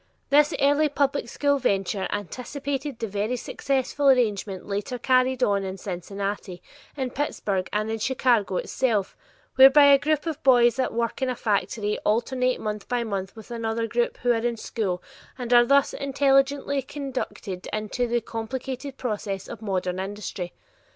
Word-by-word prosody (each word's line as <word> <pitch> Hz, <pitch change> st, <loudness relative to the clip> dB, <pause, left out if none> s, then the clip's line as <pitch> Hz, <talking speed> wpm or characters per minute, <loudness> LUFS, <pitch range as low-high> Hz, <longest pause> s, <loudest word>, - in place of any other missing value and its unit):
This 295 Hz, +1 st, +5 dB
early 290 Hz, +2 st, +3 dB
public 280 Hz, -3 st, 0 dB
school 285 Hz, +2 st, +1 dB
venture 195 Hz, -3 st, 0 dB
anticipated 270 Hz, -, -4 dB
the 230 Hz, -, -3 dB
very 205 Hz, +4 st, -1 dB
successful 275 Hz, +2 st, 0 dB
arrangement 210 Hz, -7 st, +1 dB
later 205 Hz, +5 st, -3 dB
carried 255 Hz, 0 st, +2 dB
on 200 Hz, -3 st, +2 dB
in 190 Hz, 0 st, -5 dB
Cincinnati, 195 Hz, 0 st, -5 dB, 0.4 s
in 260 Hz, -2 st, -2 dB
Pittsburgh 200 Hz, -10 st, -2 dB
and 215 Hz, +1 st, -1 dB
in 225 Hz, -, -2 dB
Chicago 235 Hz, -5 st, +1 dB
itself, 225 Hz, -7 st, -1 dB, 0.4 s
whereby 270 Hz, +2 st, +9 dB
a 275 Hz, -, +6 dB
group 305 Hz, +1 st, 0 dB
of 315 Hz, -2 st, -4 dB
boys 245 Hz, -1 st, +5 dB
at 260 Hz, -, +1 dB
work 235 Hz, +2 st, -2 dB
in 260 Hz, -, +1 dB
a 250 Hz, -, -1 dB
factory 210 Hz, -1 st, -1 dB
alternate 250 Hz, +3 st, 0 dB
month 210 Hz, -1 st, -4 dB
by 245 Hz, -1 st, 0 dB
month 200 Hz, -3 st, -4 dB
with 220 Hz, +2 st, -12 dB
another 230 Hz, -1 st, -2 dB
group 235 Hz, +2 st, -1 dB
who 245 Hz, -, +4 dB
are 235 Hz, -, +3 dB
in 235 Hz, 0 st, -1 dB
school 195 Hz, -6 st, -3 dB, 0.3 s
and 245 Hz, -1 st, -2 dB
are 240 Hz, 0 st, +7 dB
thus 280 Hz, +2 st, +3 dB
intelligently 275 Hz, 0 st, +2 dB
conducted 260 Hz, -9 st, -5 dB
into 215 Hz, +3 st, -2 dB
the 240 Hz, 0 st, 0 dB
complicated 260 Hz, +4 st, -5 dB
processes 205 Hz, -5 st, -3 dB
of 220 Hz, -, -8 dB
modern 185 Hz, -3 st, -2 dB
industry. 190 Hz, -2 st, -5 dB
235 Hz, 155 wpm, -25 LUFS, 205-265 Hz, 0.4 s, whereby